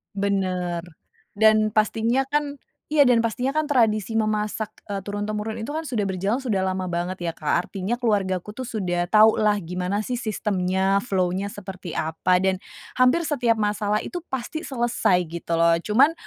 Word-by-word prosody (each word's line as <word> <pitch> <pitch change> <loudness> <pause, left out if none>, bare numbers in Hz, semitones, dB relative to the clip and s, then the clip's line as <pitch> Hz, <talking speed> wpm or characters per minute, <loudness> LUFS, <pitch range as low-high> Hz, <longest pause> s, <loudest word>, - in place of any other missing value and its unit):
Bener 185 -3 -1 0.5
dan 215 0 +4
pastinya 225 +4 +2
kan 290 -1 -1 0.3
iya 300 - +5
dan 245 - +5
pastinya 245 +3 -1
kan 310 - +2
tradisi 225 -6 +2
memasak, 215 -1 -1 0.2
eee, 200 -1 -4
turun-temurun 210 +2 -3
itu 225 +6 -5
kan 315 - -2
sudah 240 -10 -2
berjalan 195 +4 -1
sudah 230 -8 -1
lama 190 0 -1
banget 175 +1 -3
ya, 165 - -1
Kak. 170 +3 0
Artinya 200 +4 -3
keluarga 205 -6 +1
ku 210 +4 -9
sudah 190 -8 -2
tau 215 0 +7
lah 210 -1 +3
gimana 180 +3 -3
sih 250 - -3
sistemnya, 195 -4 0
flow-nya 190 -2 -1
seperti 190 -4 -8
apa, 160 +3 +1
dan 190 0 0 0.3
hampir 255 +7 +3
setiap 245 -7 +1
masalah 210 0 0
itu 355 - -5
pasti 265 +4 -4
selesai 235 - +1
gitu 170 0 -3
loh. 170 0 +5
Cuman 265 - +4
210 Hz, 160 wpm, -24 LUFS, 185-230 Hz, 0.5 s, tau